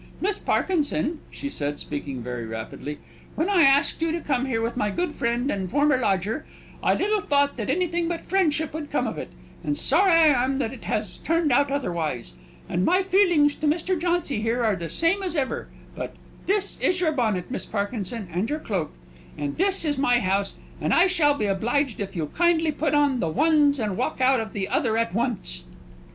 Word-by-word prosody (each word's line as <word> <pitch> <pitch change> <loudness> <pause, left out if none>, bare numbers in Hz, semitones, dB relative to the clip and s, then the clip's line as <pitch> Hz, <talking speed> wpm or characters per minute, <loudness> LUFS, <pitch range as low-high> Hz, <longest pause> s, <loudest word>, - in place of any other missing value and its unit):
"Miss 405 +2 -1
Parkinson," 310 -3 0
she 280 - -6
said, 145 - -3
speaking 140 -4 -5
very 120 -1 -4
rapidly, 115 +6 -6 0.4
"when 320 - 0
I 370 -4 +5
asked 280 +1 +4
you 330 0 +1
to 335 - -1
come 270 -4 -1
here 235 -4 0
with 230 +1 -2
my 210 -4 0
good 345 - -2
friend 240 +4 0
and 190 -2 -3
former 290 +2 +3
lodger, 215 - 0 0.4
I - - +3
little 420 +1 +1
thought 285 -7 +2
that 220 -1 -3
anything 345 +2 0
but 340 -1 -3
friendship 320 -5 0
would 305 -2 -5
come - - 0
of - - -3
it; - - -6 0.3
and 295 - -1
sorry 345 +6 +3
I 305 -7 +5
am 265 +1 0
that 250 -3 -2
it 250 - -11
has 210 -2 -2
turned 330 -2 +1
out 280 +3 +3
otherwise. 170 - -2 0.3
And 180 - 0
my 370 - +3
feelings 355 -6 +4
to 310 - -2
Mr. 335 +5 +1
Jauncy 345 -9 -1
are 230 -3 +1
the 170 -2 -5
same 335 - +1
as 365 -3 -2
ever; 275 -4 -1 0.3
but - - -6 0.3
this 400 +1 0
is 365 0 +1
your 335 -3 +2
bonnet, 220 - -1
Miss 260 - -4
Parkinson, 205 0 -3
and 190 +7 -1
your 300 - -1
cloak. 195 - -3 0.4
And 145 -1 -3
this 385 -1 +2
is 290 -3 0
my 245 -3 +4
house; 195 -1 0 0.3
and - - +2
I 345 - +6
shall 320 -6 +3
be 215 - -1
obliged 235 +6 0
if 200 -1 -4
you'll 165 -3 -1
kindly 330 - +2
put 300 0 0
on 285 -3 +3
the 165 - 0
ones, 290 - +3
and 210 -4 -1
walk - - -2
out 260 0 +4
of 220 -1 -5
the 195 -2 -2
other 225 -3 +1
at 230 -4 0
once!" 200 - -2
275 Hz, 200 wpm, -25 LUFS, 210-325 Hz, 0.4 s, I